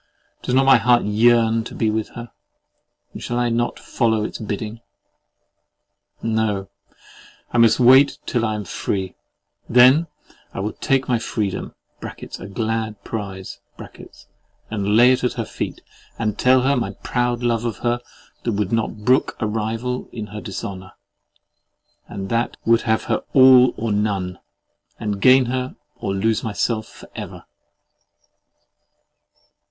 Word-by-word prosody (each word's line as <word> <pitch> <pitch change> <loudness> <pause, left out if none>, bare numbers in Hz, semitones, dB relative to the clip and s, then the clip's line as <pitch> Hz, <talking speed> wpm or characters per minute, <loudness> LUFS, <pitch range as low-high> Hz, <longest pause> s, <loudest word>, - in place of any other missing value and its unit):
Does 125 - -1
not 135 +1 +4
my 135 - +7
heart 120 -1 +3
yearn 115 +1 +3
to 120 - -9
be 110 -2 +1
with 110 0 -2
her; 120 -1 -8 0.8
and - - -8
shall 120 - -3
I 120 0 +1
not 120 +1 -1
follow 110 -3 0
its - - -5
bidding? 110 +1 -5 1.4
No, 110 -3 -1 0.8
I 120 - +1
must 115 +1 +5
wait 130 +3 +6
till 120 -2 -1
I 110 -2 0
am 105 -1 -5
free; 95 +1 -3 0.5
and - - -8
then 130 +7 +7 0.5
I - - -4
will 105 +2 -3
take 135 -2 0
my 120 -2 +1
Freedom 105 -4 -3 0.3
(a - - -8
glad 110 0 -3
prize) 95 -4 -6 1.1
and 105 -1 0
lay 125 +2 +7
it 130 - 0
at 125 - +1
her - - -3
feet - - -5 0.4
and 110 -3 -1
tell 130 +1 +4
her 140 +2 +2
my 115 -6 -2
proud 120 -1 -1
love 120 -1 +1
of 115 -4 -3
her 120 0 +1 0.4
that 115 - -2
would 100 -1 -1
not 110 -2 -2
brook 130 +1 +2
a 110 - -1
rival 115 +4 -3
in 110 -3 -6
her 105 - -6
dishonour, 95 -2 -7 1.1
and 95 -1 -6
that 115 +1 -1
would 115 0 +4
have 110 - +2
her - - 0 0.2
all 130 -2 +7
or 115 -1 -2
none, 100 -3 -1 0.6
and 105 -2 -3
gain 130 +2 +6
her 130 +1 -3 0.2
or 95 - -3
lose 110 +3 0
myself 110 0 -1
for - - -14
ever! - - -8
115 Hz, 145 wpm, -21 LUFS, 105-120 Hz, 1.4 s, my